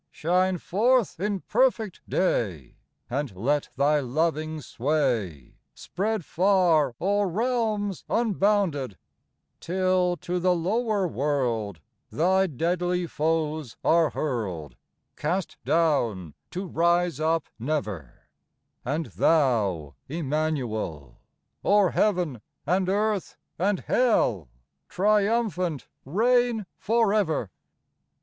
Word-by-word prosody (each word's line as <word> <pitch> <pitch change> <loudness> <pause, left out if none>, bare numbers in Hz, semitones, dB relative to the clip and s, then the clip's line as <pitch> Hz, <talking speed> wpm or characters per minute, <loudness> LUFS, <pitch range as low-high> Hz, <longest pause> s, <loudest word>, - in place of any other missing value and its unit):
Shine 180 +3 +1
forth 225 +4 +1
in 200 0 -1
perfect 225 -4 +1
day, 95 - -1 0.3
And 135 -5 -3
let 140 +9 0
Thy 145 +2 +3
loving 155 +3 -1
sway 120 - -2 0.2
Spread 205 -1 -3
far 175 -8 +3
o'er 200 +2 +1
realms 215 -1 -1
unbounded 195 - +1 0.6
Till 185 0 +1
to 180 +1 -3
the 180 0 +2
lower 205 +3 0
world 120 - -1 0.3
Thy 190 +4 +2
deadly 175 +4 -1
foes 155 -4 -2
are 165 -2 +4
hurled, 100 - -3 0.2
— - - -51
Cast 175 +4 -2
down, 120 - +1 0.2
to 185 +2 -5
rise 170 -1 +1
up 160 0 +1 0.2
never 110 - -4 0.3
\ - - -51
And 150 +6 -2
Thou, 105 - +1 0.2
Immanuel, 130 - -3 0.4
O'er 200 -2 +4
heaven 175 - 0 0.2
and 185 +3 +1
earth 210 0 -1 0.2
and 195 +2 +1
hell 120 - +1 0.4
Triumphant 200 - +1 0.2
reign 235 - +2
forever 205 - +1
165 Hz, 95 wpm, -26 LUFS, 135-195 Hz, 0.6 s, are